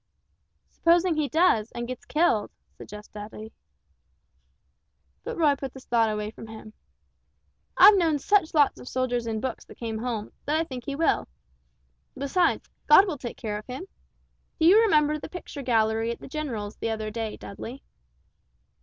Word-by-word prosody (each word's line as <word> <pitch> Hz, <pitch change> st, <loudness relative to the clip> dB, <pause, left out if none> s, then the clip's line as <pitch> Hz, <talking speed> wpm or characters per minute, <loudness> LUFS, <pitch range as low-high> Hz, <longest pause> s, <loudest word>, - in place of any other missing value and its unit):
"Supposing 345 Hz, +2 st, +3 dB
if 315 Hz, -, -1 dB
he 300 Hz, -3 st, 0 dB
does, 240 Hz, -9 st, +3 dB
and 240 Hz, 0 st, -4 dB
gets 255 Hz, 0 st, -7 dB
killed?" 300 Hz, -10 st, +1 dB, 0.3 s
suggested 210 Hz, +1 st, -11 dB
Dudley. 215 Hz, +1 st, -9 dB, 1.7 s
But 475 Hz, 0 st, -5 dB
Roy 300 Hz, -4 st, +4 dB
put 270 Hz, -2 st, -7 dB
this 265 Hz, -, -12 dB
thought 230 Hz, -2 st, +2 dB
away 210 Hz, 0 st, -3 dB
from 225 Hz, -, -11 dB
him. 220 Hz, -1 st, -11 dB, 1.0 s
"I've 415 Hz, -, +9 dB
known 325 Hz, -4 st, +2 dB
such 325 Hz, +2 st, +2 dB
lots 290 Hz, -3 st, +3 dB
of 250 Hz, -, -9 dB
soldiers 245 Hz, -2 st, -1 dB
in 220 Hz, -1 st, -2 dB
books 260 Hz, -2 st, -4 dB
that -, -, -15 dB
come 225 Hz, -2 st, -4 dB
home, 225 Hz, -3 st, -4 dB, 0.2 s
that 295 Hz, -, +1 dB
I -, -, +2 dB
think 255 Hz, -5 st, -8 dB
he 280 Hz, -, -2 dB
will. 325 Hz, +3 st, +1 dB, 0.9 s
Besides 280 Hz, +6 st, +1 dB, 0.2 s
God 380 Hz, +7 st, +8 dB
will 325 Hz, -8 st, -4 dB
take 240 Hz, -2 st, -6 dB
care 210 Hz, -2 st, -4 dB
of 210 Hz, -, -15 dB
him. 260 Hz, +8 st, -6 dB, 0.7 s
Do 320 Hz, -, +3 dB
you 395 Hz, +6 st, +7 dB
remember 305 Hz, -8 st, +3 dB
the -, -, -8 dB
picture 340 Hz, -5 st, -8 dB
gallery 225 Hz, -2 st, +1 dB
at 235 Hz, -, -4 dB
the -, -, -10 dB
general's 245 Hz, -8 st, -5 dB
the 230 Hz, -, -3 dB
other 220 Hz, -1 st, -3 dB
day, 225 Hz, -1 st, -4 dB
Dudley?" 235 Hz, +6 st, -9 dB
255 Hz, 170 wpm, -26 LUFS, 220-310 Hz, 1.7 s, I've